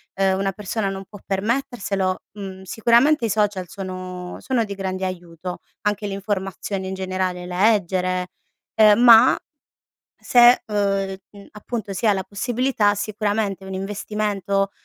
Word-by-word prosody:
uhm, 190 0 +2
una 195 0 0
persona 205 +1 -3
non 195 0 -6
può 205 +1 -12
permetterselo, 195 -3 -1
mhmm, 195 -2 -8
sicuramente 235 - +3
i 225 - -1
social 205 -3 0
sono 185 -1 -7
sono 255 -3 0
di 200 -1 -6
grande 190 -1 -3
aiuto, 175 -1 -6 0.3
anche 210 0 -1
le 200 - -3
informazioni 195 -1 -3
in 190 - -4
generale, 185 -1 -3
leggere, 185 -2 +1 0.5
ehm, 215 0 +6
ma, 240 +1 +7 0.8
se, 245 0 +5
uhm, 195 -2 -1 0.3
appunto 215 -1 -5
si 220 +4 -2
ha 210 - +6
la 190 - -2
possibilità 225 +1 0
sicuramente 205 -1 -2
un 190 - -6
investimento, 200 0 -2
195 Hz, 135 wpm, -22 LUFS, 190-215 Hz, 0.8 s, ma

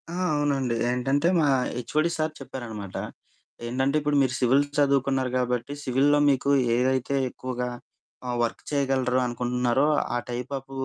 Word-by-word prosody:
ఆ! - - -6 0.2
అవునండి. 140 -4 0 0.2
ఏంటంటే 135 +5 +1
మా 150 - +3 0.3
హెచ్ఓడి 155 +6 0
సారు 155 0 -1
చెప్పారనమాట, 110 -8 -7 0.7
ఏంటంటే 130 +4 0
ఇప్పుడు 150 0 +1
మీరు 130 -2 +1
సివిల్ 130 +3 +4
చదువుకున్నారు 135 -2 +2
గాబట్టి, 125 +1 -1
సివిల్‌లో 140 +3 +3
మీకు 135 0 +1 0.3
ఏదైతే 130 +2 +1
ఎక్కువగా 125 -1 -4 0.6
ఆహ్, 120 -1 -2
వర్క్ 115 - -3
చేయగలరొ 130 -3 +1
అనుకుంటున్నారో, 125 +2 0 0.3
ఆ - - +2
టైప్ 125 +2 -5
ఆఫ్ 135 +1 -20
130 Hz, 135 wpm, -26 LUFS, 125-140 Hz, 0.7 s, సివిల్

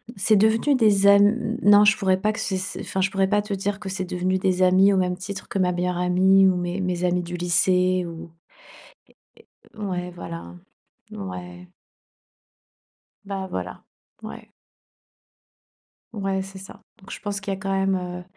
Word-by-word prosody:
c'est 215 +3 +2
devenu 220 +7 +3
des 205 -5 +3
am 205 +3 +4
non, 205 0 +7
je 215 +1 +4
pourrais 190 -2 +1
pas 215 +2 +1
que, - - -7
c 190 -1 -2
c'est, 185 - -6
enfin 190 - -3
je 190 - +1
pourrais 195 -1 +1
pas 205 0 +2
te 205 0 -5
dire 195 +1 -3
que 205 -2 -7
c'est 190 0 -4
devenu 185 +1 -1
des 185 -1 0
amis 190 +2 +5
au - - +1
même 180 -1 0
titre 195 +1 -7
que - - -4
ma 180 -1 +2
meilleure 180 0 -2
amie 190 +2 +4
ou 185 - +2
mes 180 0 -3
amis 180 0 +1
du 175 +1 -6
lycée 180 +1 +1
ou 170 0 -9 1.5
é - - -12
é - - -7
ouais, 180 -3 -4
voilà, 85 - -8 0.6
ouais. 90 -2 -8 1.6
Ben 195 -1 -5
voilà, 90 - -6 0.4
ouais. - - -10 1.6
Ouais, 195 -2 -2
c'est 195 0 -10
ça, 195 - -12 0.2
donc 190 - -14
je - - -7
pense 205 -1 -4
qu'il 200 -1 -4
y 190 - -5
a - - -14
quand 195 0 -4
même, 195 0 +1
heu 180 -1 -5
190 Hz, 180 wpm, -23 LUFS, 180-200 Hz, 1.6 s, non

